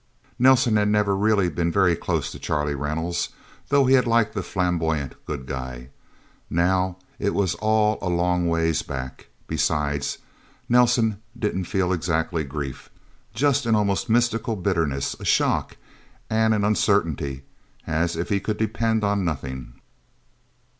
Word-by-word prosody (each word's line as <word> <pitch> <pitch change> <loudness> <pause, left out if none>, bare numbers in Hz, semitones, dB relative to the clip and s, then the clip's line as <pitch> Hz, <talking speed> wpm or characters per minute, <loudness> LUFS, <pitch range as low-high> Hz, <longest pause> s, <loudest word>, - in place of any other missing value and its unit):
Nelsen 125 -3 +5
had 105 0 +2
never 105 -1 +2
really 100 -2 +2
been 85 +1 -1
very 90 -2 +3
close - - -2
to - - -9
Charlie 75 -1 -1
Reynolds, 75 +5 -2 0.4
though 140 -1 +4
he 130 - +4
had 125 -2 +4
liked 115 -2 +2
the 100 - -2
flamboyant 85 -6 -1
Good 70 -4 -4
Guy. 65 -1 -6 0.6
Now, 90 +2 +1 0.2
it 100 - 0
was 95 -4 +1
all 110 0 +1
a 90 - -2
long 90 0 +1
ways 80 -2 +1
back, 65 -2 -7 0.2
besides. 75 -2 -1 0.5
Nelsen 120 -3 +3 0.2
didn't 105 -5 -1
feel 95 0 0
exactly 80 -1 -1
grief. 70 -2 -6 0.5
Just 140 +1 +2
an 115 - +4
almost 100 0 0
mystical 115 -1 +1
bitterness, 85 -8 -1
a - - -9
shock - - +1 0.5
and 110 0 +3
an 105 - 0
uncertainty, 80 -10 +1 0.4
as 80 +2 0
if 85 +1 -3
he 100 - +2
could 105 +2 -3
depend 110 0 0
on 100 -1 +1
nothing. 65 -6 -4
95 Hz, 140 wpm, -24 LUFS, 80-110 Hz, 0.6 s, Nelsen